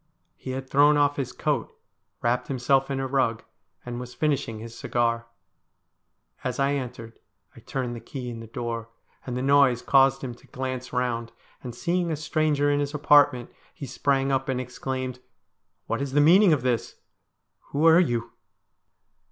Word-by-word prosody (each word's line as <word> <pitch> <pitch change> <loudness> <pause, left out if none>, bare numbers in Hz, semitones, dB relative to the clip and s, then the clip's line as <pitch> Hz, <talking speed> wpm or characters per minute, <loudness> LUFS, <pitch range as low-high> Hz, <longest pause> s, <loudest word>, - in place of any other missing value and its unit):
He - - -9
had 130 0 -5
thrown 145 +2 +5
off 145 0 +2
his 135 -3 -3
coat, - - -2 0.5
wrapped 120 +1 +1
himself 135 +1 +1
in 135 -1 -2
a 135 - -1
rug, 130 -4 0 0.4
and 120 0 -5
was 125 0 -8
finishing 140 -7 -1
his 115 +1 -9
cigar. 115 -1 -1 1.2
As 125 0 -3
I 140 +1 +2
entered 120 -4 -6 0.4
I - - -12
turned 125 -3 -4
the - - -6
key 125 +3 -7
in 115 - -7
the 115 - -9
door, 115 -1 -5 0.4
and 125 -1 -3
the 125 - -2
noise 135 -3 +4
caused 135 0 +4
him 125 -2 -4
to 120 - -19
glance 130 -1 -5
round, 120 -2 -2 0.3
and, 120 -2 -7
seeing 175 +5 -1
a - - 0
stranger 150 -1 +1
in 145 - +1
his 145 +1 -2
apartment, 145 -4 +4 0.2
he 140 - -7
sprang 135 +1 0
up 135 0 0
and 130 -1 0
exclaimed: 130 0 -4 0.3
' - - -52
What - - -2
is 140 -1 -3
the 145 - +4
meaning 180 +6 +6
of 145 -5 +2
this? 125 -3 -1 0.7
Who 145 +3 -1
are 165 +1 +7
you 120 -9 0
130 Hz, 175 wpm, -25 LUFS, 120-145 Hz, 1.2 s, are